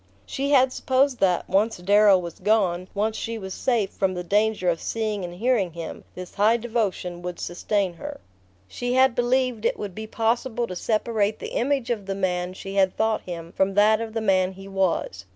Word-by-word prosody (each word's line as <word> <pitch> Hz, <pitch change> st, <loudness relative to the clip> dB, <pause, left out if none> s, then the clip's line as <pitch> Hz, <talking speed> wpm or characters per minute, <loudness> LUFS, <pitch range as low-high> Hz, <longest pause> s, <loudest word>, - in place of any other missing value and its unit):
She 275 Hz, +1 st, -3 dB
had 260 Hz, -2 st, +4 dB
supposed 260 Hz, 0 st, +1 dB
that, 180 Hz, -2 st, +2 dB
once 215 Hz, +4 st, +1 dB
Darrow 200 Hz, +2 st, +5 dB
was 170 Hz, -2 st, -6 dB
gone, 185 Hz, -5 st, +1 dB
once 215 Hz, +2 st, 0 dB
she 230 Hz, 0 st, -4 dB
was 190 Hz, -3 st, -6 dB
safe 235 Hz, -6 st, 0 dB
from 190 Hz, -1 st, -1 dB
the 180 Hz, -, -4 dB
danger 205 Hz, +1 st, +1 dB
of 170 Hz, -2 st, +1 dB
seeing 215 Hz, -3 st, -2 dB
and 175 Hz, 0 st, -6 dB
hearing 210 Hz, -4 st, +1 dB
him, 165 Hz, -1 st, -7 dB
this 180 Hz, 0 st, -8 dB
high 215 Hz, +3 st, +3 dB
devotion 215 Hz, -7 st, -2 dB
would 180 Hz, 0 st, -6 dB
sustain 190 Hz, +1 st, -1 dB
her. 170 Hz, -, -8 dB, 0.5 s
She 245 Hz, -, -3 dB
had 260 Hz, -1 st, +5 dB
believed 245 Hz, -1 st, +1 dB
it -, -, +1 dB
would 205 Hz, -3 st, -5 dB
be 220 Hz, +3 st, -7 dB
possible 235 Hz, +2 st, 0 dB
to 185 Hz, -, -7 dB
separate 215 Hz, +1 st, 0 dB
the -, -, -7 dB
image 265 Hz, -1 st, 0 dB
of 210 Hz, -5 st, -3 dB
the 195 Hz, -, -2 dB
man 180 Hz, -2 st, -1 dB
she 195 Hz, +1 st, -8 dB
had 190 Hz, -2 st, +2 dB
thought 220 Hz, 0 st, +1 dB
him 170 Hz, -2 st, -7 dB
from 190 Hz, +1 st, 0 dB
that 215 Hz, +2 st, +4 dB
of 225 Hz, -1 st, -5 dB
the 225 Hz, -, -2 dB
man 190 Hz, -3 st, +2 dB
he 195 Hz, +1 st, -11 dB
was. 185 Hz, -, -1 dB
205 Hz, 200 wpm, -24 LUFS, 185-230 Hz, 0.5 s, Darrow